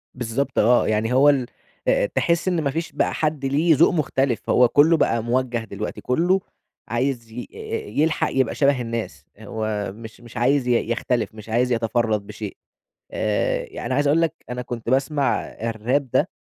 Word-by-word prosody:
بالضبط 125 +2 -2
آه، 120 +3 +4
يعني 110 +2 0
هو 135 +3 +6
ال 135 -3 +2 0.4
آآ، - - +3
تحس 170 +2 0
إن 175 -3 +1
ما 140 -2 0
فيش 165 +3 -3
بقى - - 0
حد 150 -3 -1
ليه 155 +4 +3
ذوق 165 +4 +4
مختلف، 135 -6 0
هو 125 - +5
كلّه 155 +6 +5
بقى 115 -6 +1
موجّه 125 +1 0
دلوقتي، 105 0 -6
كلّه 175 +9 +2 0.5
عايز 120 -1 -2
ي 120 +2 -7 0.5
يلحق 160 +1 +2
يبقى 130 -3 +1
شبه 140 -3 +2
الناس، 115 -1 -5
هو 110 -2 -3
مش 110 +1 -11
مش 120 -1 -11
عايز 130 +2 +2
ي 120 -2 +1
يختلف، 120 -2 -1
مش 110 0 -11
عايز 125 +3 +1
يتفرّد 115 -3 0
بشيء، - - -7 0.5
آآ، 105 -1 0
يعني 125 - -4
عايز 145 +2 +2
أقول 155 +4 +3
لك 165 - +1 0.2
أنا 125 0 -3
كنت 120 -2 -5
باسمع 135 +2 +1
الراب 115 +5 -2
ده 145 +7 +2
125 Hz, 170 wpm, -22 LUFS, 115-145 Hz, 0.5 s, هو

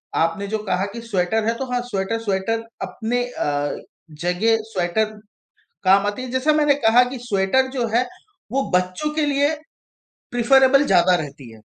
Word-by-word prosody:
आपने 165 +5 0
जो 220 +2 -1
कहा 190 -2 0
कि 235 - -6
स्वेटर 220 -1 0
है 230 - +2
तो 265 - -3
हाँ, 245 - 0
स्वेटर 200 +3 -2
स्वेटर 220 +2 -1 0.2
अपने 245 +2 -2
अ, 145 -11 -2 0.5
जगह 195 +6 +2 0.2
स्वेटर 185 +4 0 0.7
काम 195 +1 +4
आती 205 +5 -3
है, 255 - -6
जैसा 260 +4 +2
मैंने 295 -1 +4
कहा 240 +3 +6
कि 260 - -6
स्वेटर 225 +3 +1
जो 245 -3 -1
है, 245 +1 +2 0.4
वो 270 +2 +1
बच्चों 185 +11 0
के 310 -1 +1
लिए 285 +1 +2 0.8
प्रेफरेबल 265 +3 +5
ज़्यादा 180 -4 +4
रहती 140 -6 -6
है। 110 - -15
225 Hz, 165 wpm, -21 LUFS, 185-255 Hz, 0.8 s, कहा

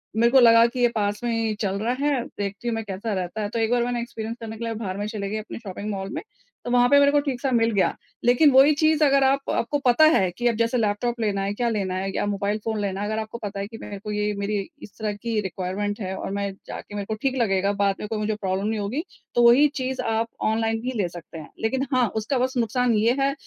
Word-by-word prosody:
मेरे 235 +2 +3
को 265 - +7
लगा 230 -1 +7
कि 250 +2 -6
ये 245 - +5
पास 205 +1 -1
में 240 - 0
ही 225 -1 0
चल 195 -2 0
रहा 230 +4 0
है, 275 -5 +1
देखती 205 -4 -5
हूँ 235 - 0
मैं 225 - -3
कैसा 205 +2 -4
रहता 185 +2 -3
है, 205 - -2
तो 230 - -3
एक 225 0 +1
बार 245 -1 +3
मैंने 240 0 -1
एक्सपीरियंस 230 -1 -6
करने 225 -1 -7
के 235 - -6
लिए 230 - -2
बाहर 200 -4 -4
में 205 - -3
चली 210 -3 -4
गई 215 - -2
अपनी 215 - -7
शॉपिंग 205 -1 -6
मॉल 195 -1 -4
में 315 - -4 0.4
तो 245 - -3
वहाँ 245 0 +4
पे 285 - +6
मेरे 280 0 +5
को 290 - +4
ठीक 275 -4 -2
सा 270 - 0
मिल 230 -1 +3
गया। 195 -2 +2 0.3
लेकिन 250 +5 +5
वही 270 +3 +7
चीज़ 310 -1 +3
अगर 275 -1 +4
आप 275 +1 +1
आपको 270 +5 0
पता 250 +5 +6
है 190 -2 +3
कि 240 +7 -1
अब 235 - +2
जैसे 230 +2 +1
लैपटॉप 230 +2 0
लेना 205 -3 0
है, 200 +1 -1
क्या 235 +2 0
लेना 195 -4 -1
है 190 +1 -2
या - - 0
मोबाइल 205 0 -1
फ़ोन 220 -1 -1
लेना 195 -1 -2
है। 205 - -2
अगर 220 +1 -2
आपको 220 +1 -5
पता 200 -1 -4
है 200 - -3
कि 225 +1 -10
मेरे 200 - -7
को 210 +1 -6
ये 210 0 0
मेरी 200 +1 -1 0.2
इस - - -10
तरह 215 -1 -1
की 220 +2 -2
रिक्वायरमेंट 195 +2 -3
है 190 -1 -3
और - - -5
मैं 200 0 -2 0.2
जाके 205 - -8
मेरे 200 -1 -3
को 220 - -3
ठीक 270 -1 0
लगेगा 195 -2 +2
बाद 200 -1 +2
में - - -5
कोई 220 0 -3
मुझे 215 0 -1
प्रॉब्लम 195 -1 -2
नहीं 220 0 -1
होगी। 220 +10 -2 0.3
तो 240 - +4
वही 270 +5 +7
चीज़ 260 0 -2
आप 225 0 0 0.2
ऑनलाइन 225 0 0
भी 250 +2 -2
ले 180 - 0
सकते 170 -1 -10
हैं। 155 - -9
लेकिन 260 +5 0
हाँ, 250 -2 +3
उसका 220 +5 -1
बस 255 +1 -1
नुकसान 240 +1 +1
ये 225 +3 +3
है 275 0 +2
220 Hz, 275 wpm, -24 LUFS, 205-245 Hz, 0.4 s, को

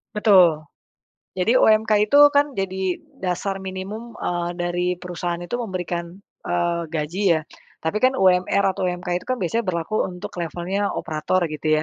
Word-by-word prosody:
Betul, 185 -8 +5 0.7
jadi 225 +7 +3
UMK 215 -1 +4
itu 285 - +3 0.2
kan 285 -1 +2
jadi 190 -1 -1 0.2
dasar 190 +1 -2
minimum, 190 +5 -7
eee, 175 0 -2
dari 175 0 -1
perusahaan 175 -1 -4
itu 175 +8 -4
memberikan, 175 -4 -4 0.3
eee, 175 -1 0
gaji 165 +5 -3
ya. - - -2 0.4
Tapi 160 +6 -1
kan 255 +2 +4
UMR 185 0 +3
atau - - -2
UMK 180 0 -5
itu - - -15
kan 255 - 0
biasanya 225 +6 -1
berlaku 170 +4 -1
untuk 180 -1 -8
levelnya 175 +5 -2
operator 160 +4 -1
gitu 155 0 0
180 Hz, 145 wpm, -22 LUFS, 175-205 Hz, 0.7 s, Betul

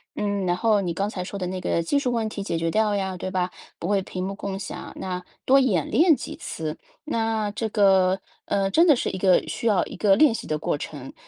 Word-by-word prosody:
嗯， 200 -2 -1
然 175 0 +1
后 215 0 +3
你 175 -3 -2
刚 200 +4 -1
才 180 -4 -4
说 200 +2 -6
的 180 - -2
那 185 0 -4
个 170 - 0
技 170 +13 0
术 255 -3 0
问 230 -2 0
题 210 -2 -5
解 180 - -2
决 165 0 0
掉 215 +3 +2
呀， 190 -2 -2
对 185 +1 -5
吧？ 180 -1 0 0.3
不 170 - -4
会 200 -1 +2
屏 185 -1 -6
幕 195 +1 -4
共 195 -1 -5
享， - - -7
那 180 -1 -4 0.2
多 270 - +6
演 210 - +2
练 325 -2 +5
几 - - -7
次， 155 -1 -5 0.3
那 225 -6 0
这 220 +1 -3
个， 190 -3 +4 0.2
呃， 195 -1 0
真 330 - +5
的 310 - +7
是 250 - -1
一 - - -4
个 185 -1 +4
需 230 - -3
要 205 -5 +3
一 - - -9
个 195 -2 +3
练 295 -3 +5
习 - - -6
的 155 - -1
过 150 - -1
程。 140 -2 -8
195 Hz, 265 characters per minute, -24 LUFS, 180-220 Hz, 0.3 s, 的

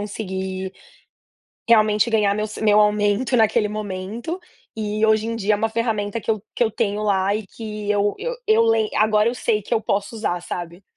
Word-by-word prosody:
conseguir, 190 -2 -4 1.0
realmente, 215 0 +4
ganhar 210 -3 +2
meu 215 +1 -1
sa 215 - -8
meu 210 -1 +5
aumento 210 +4 +2
naquele 215 -1 +3
momento. 215 - -5 0.4
E, 215 0 -1
hoje 220 0 +3
em 230 - -2
dia, 210 -1 +1
é - - 0
uma 225 +2 0
ferramenta 220 -1 -1
que 225 - -2
eu 215 -2 0
que - - +2
eu 220 - 0
tenho 205 -1 -1
lá 200 -1 +1
e 215 0 -3
que 210 -1 -6
eu 205 0 +2
eu - - -3
eu 225 +1 +5
lei 225 -1 +2
agora 215 0 +3
eu 240 - -1
sei 225 -3 0
que 235 - -2
eu 220 - +2
posso 205 +2 -2
usar, 180 -5 -2
sabe. 175 +1 -6
210 Hz, 195 wpm, -22 LUFS, 205-225 Hz, 1.0 s, meu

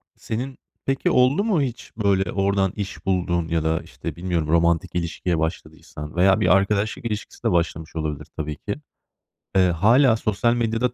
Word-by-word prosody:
Senin 125 +4 -5 0.3
peki 135 0 +1
oldu 130 +9 +4
mu 205 -8 +2
hiç 125 -3 -4
böyle 95 -4 +1
oradan 100 -1 +1
iş 100 -2 -6
bulduğun? 85 -3 0
Ya 80 -1 0
da, 80 0 +1
işte, - - -7
bilmiyorum, 85 -3 -1
romantik 85 +2 +2
ilişkiye 85 0 -1
başladıysan 80 -1 -5
veya 95 +2 +4
bir - - +2
arkadaşlık 100 +3 0
ilişkisi 105 -2 -5
de - - +2
başlamış 85 -2 -1
olabilir 75 -3 -3
tabii 75 -1 -3
ki. 100 - -4 0.8
Iıı, 90 -2 +5
hâlâ 110 - +5
sosyal 110 +2 +1
medyada 120 +1 0
95 Hz, 160 wpm, -23 LUFS, 85-115 Hz, 0.8 s, Iıı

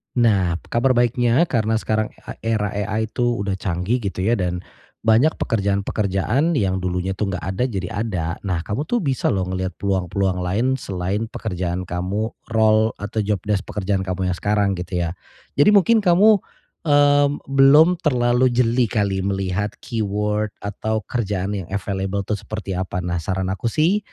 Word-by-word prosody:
Nah, 100 -8 +3 0.2
kabar 130 +2 +2
baiknya 120 +3 +3
karena 115 -9 +1
sekarang, 110 -1 0
e - - -11
era 110 -3 -1
AI 105 +2 -2
itu 120 +1 0 0.2
udah 100 -1 -2
canggih 95 +6 -1
gitu 100 -5 -4
ya 115 +4 +2
dan 90 -1 -2 0.4
banyak 115 +8 +4
pekerjaan-pekerjaan 100 - 0
yang 95 -5 +1
dulunya 90 +1 -2
tuh 100 -3 -1
nggak 90 - -4
ada 95 +6 -1
jadi 95 -8 -4 0.2
ada. 90 -7 -2 0.2
Nah, 90 -3 -1
kamu 110 - -3
tuh 240 +3 0
bisa 135 -6 -1
loh 95 -2 +1
ngelihat 95 0 -3
peluang-peluang 95 -1 -1
lain 110 +9 0
selain 100 +1 -3
pekerjaan 90 -5 -3
kamu 90 +5 -2 0.2
role 110 0 +3
atau 105 +2 -5
jobdesk 105 0 -1
pekerjaan 95 -1 -2
kamu 95 0 -1
yang 90 - -2
sekarang 100 -2 +1
gitu 90 0 -2
ya. 85 - -1 0.5
Jadi 210 +9 +6
mungkin 220 +3 +5
kamu, 205 +2 +5 0.5
mmm, 145 -1 +5 0.2
belum 145 +6 +6
terlalu 125 -4 +2
jeli 120 0 +3
kali 100 -3 0
melihat 95 +1 -2
keyword 105 -1 -2
atau 110 +2 -2
kerjaan 100 -3 -1
yang 95 - -6
available 100 0 -2
tuh 105 +2 -2
seperti 105 -1 -6
apa. 90 -1 -3
Nah, 85 -1 -2
saran 95 +2 -2
aku 95 +4 -3
sih 160 - +2
105 Hz, 160 wpm, -21 LUFS, 95-120 Hz, 0.5 s, Jadi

